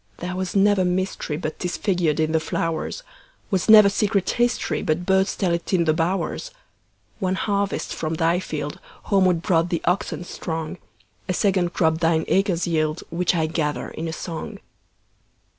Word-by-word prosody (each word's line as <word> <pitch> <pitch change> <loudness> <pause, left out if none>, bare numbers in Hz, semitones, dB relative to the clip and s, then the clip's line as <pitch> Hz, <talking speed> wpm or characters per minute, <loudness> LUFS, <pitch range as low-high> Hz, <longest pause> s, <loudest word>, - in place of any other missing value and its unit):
There 180 +1 -4
was 185 0 -3
never 200 -1 +4
mysteryBut 180 -4 -2
'tis 180 -1 -2
figured 175 -7 0
in 155 0 +1
the 160 - +3
flowers; 165 - -3 0.5
SWas 190 +2 0
never 215 -2 +9
secret 200 -1 +1
historyBut 180 -8 0
birds 190 +1 +2
tell 180 -4 0
it 170 +3 -3
in 175 -2 +4
the 155 - +3
bowers. 180 - -1 0.7
One 185 -2 0
harvest 200 0 -1
from 160 0 -3
thy 165 +2 +2
fieldHomeward 170 +3 -1
brought 165 -1 +2
the 170 -2 -2
oxen 180 0 0
strong;A 160 - -6
second 185 -3 +1
crop 160 -1 +2
thine 165 -1 +2
acres 190 -3 +1
yield, 155 -1 0
Which 175 +2 +1
I 160 -2 +1
gather 155 -2 -2
in 165 - -5
a - - -3
song. 165 0 -6
175 Hz, 150 wpm, -23 LUFS, 160-190 Hz, 0.7 s, never